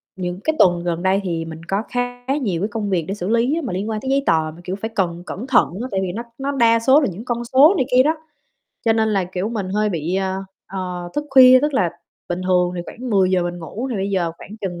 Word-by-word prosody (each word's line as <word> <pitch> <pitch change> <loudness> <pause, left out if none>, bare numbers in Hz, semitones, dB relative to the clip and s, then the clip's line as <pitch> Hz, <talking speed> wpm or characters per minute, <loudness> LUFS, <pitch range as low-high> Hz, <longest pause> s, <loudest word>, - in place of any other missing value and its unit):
những 180 -1 -4
cái 315 - 0
tuần 175 -1 +4
gần 175 0 -2
đây 190 +1 +3
thì 165 -3 -2
mình 160 0 -8
có 195 +2 0
khá 245 0 -3 0.2
nhiều 180 -7 -1
cái 205 - +1
công 210 -1 -3
việc 175 -4 0
để 195 - -2
xử 195 -2 -4
lý 245 +8 +2
mà 220 - -3
liên 195 +4 -3
quan 215 -1 -3
tới 265 - -4
giấy 275 0 +2
tờ 160 -1 +2
mà, 175 - -14
kiểu, 185 +2 -3
phải 220 +3 -5
cần 175 -3 -1
cẩn 225 +8 -6
thận 255 -3 +4
á, 250 - -3
tại 190 - 0
vì 185 - -2
nó 225 +6 -5
nó 275 +1 -2
đa 230 -4 +4
số 265 +6 +5
là 280 - +1
những 205 +7 -9
con 240 -1 -2
số 270 +8 +6
này 260 - +1
kia 255 +1 +6
đó, 315 +3 +1 0.7
cho 225 - +4
nên 220 0 +1
là, 195 -3 +1
kiểu, 180 +3 -3
mình 215 -5 -3
hơi 210 +2 +1
bị, 170 -2 -2
a, 190 -1 -1 0.3
ờ, 180 -2 -5
thức 295 - -1
khuya. 255 -1 +8
Tức 295 -1 0
là 180 -8 +2 0.4
bình 175 +1 -2
thường 180 -1 +2
thì - - -2
khoảng 250 +1 -7
10:00 190 -3 +3
mình 175 0 -4
ngủ 205 +9 -5
thì 235 - -2
bây 195 +1 -2
giờ 175 -4 0
khoảng 210 - -11
chừng 175 -3 -4
195 Hz, 270 wpm, -20 LUFS, 180-245 Hz, 0.7 s, khuya